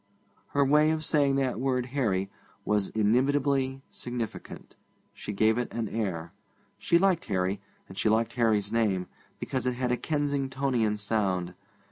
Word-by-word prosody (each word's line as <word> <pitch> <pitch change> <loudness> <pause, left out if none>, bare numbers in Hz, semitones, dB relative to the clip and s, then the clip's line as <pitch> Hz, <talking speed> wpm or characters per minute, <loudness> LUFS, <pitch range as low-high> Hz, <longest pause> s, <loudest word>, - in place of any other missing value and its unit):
Her 140 -1 +3
way 150 +3 +4
of 160 -1 -1
saying 140 -3 +3
that 130 -4 0
word 130 -1 0
'Harry' 105 -8 -1 0.3
was 105 -2 +1
inimitably 135 +4 +1
significant. 120 -3 -6 0.4
She - - -6
gave 110 +3 +2
it 125 - -3
an 115 -2 -2
air. 90 -6 -3 0.5
She 170 - +3
liked 185 -2 +2
Harry, 95 0 -1 0.3
and 95 - -11
she 110 - +1
liked 115 +1 +1
Harry's 110 -4 +1
name, 105 -6 +1 0.3
because 130 -2 -2
it 125 - 0
had 125 0 -1
a 125 - +1
Kensingtonian 135 -7 0
sound. 100 -4 0
120 Hz, 145 wpm, -28 LUFS, 105-135 Hz, 0.5 s, way